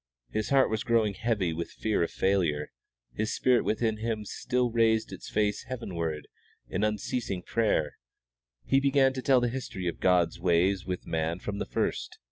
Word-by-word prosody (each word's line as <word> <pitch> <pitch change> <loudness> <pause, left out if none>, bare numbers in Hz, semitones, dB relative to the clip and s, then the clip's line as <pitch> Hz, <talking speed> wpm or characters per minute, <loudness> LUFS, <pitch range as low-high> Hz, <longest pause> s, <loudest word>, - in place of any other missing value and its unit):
His 110 -1 -2
heart 135 -3 +4
was 110 - 0
growing 115 -3 +2
heavy 100 -6 0
with 85 +1 -4
fear 110 -4 -1
of 85 - +1
failure, 85 -6 0 0.4
his 110 +1 -2
spirit 125 -1 +3
within 110 0 0
him 110 -1 -3
still 125 +3 -1
raised 110 -1 +2
its - - -8
face 105 -1 0
heavenward 85 - -4 0.4
in 95 - -2
unceasing 105 -2 -2
prayer. 110 -9 0 0.7
He 135 - +4
began 135 -1 +3
to 130 - -4
tell 130 -1 +4
the 120 - +2
history 115 -7 -5
of 85 - -3
God's 90 -2 +2
ways 90 +2 +2
with 90 -1 -3
man 80 +1 -1
from 100 +2 -5
the - - -3
first. - - -2
105 Hz, 170 wpm, -28 LUFS, 90-115 Hz, 0.7 s, heart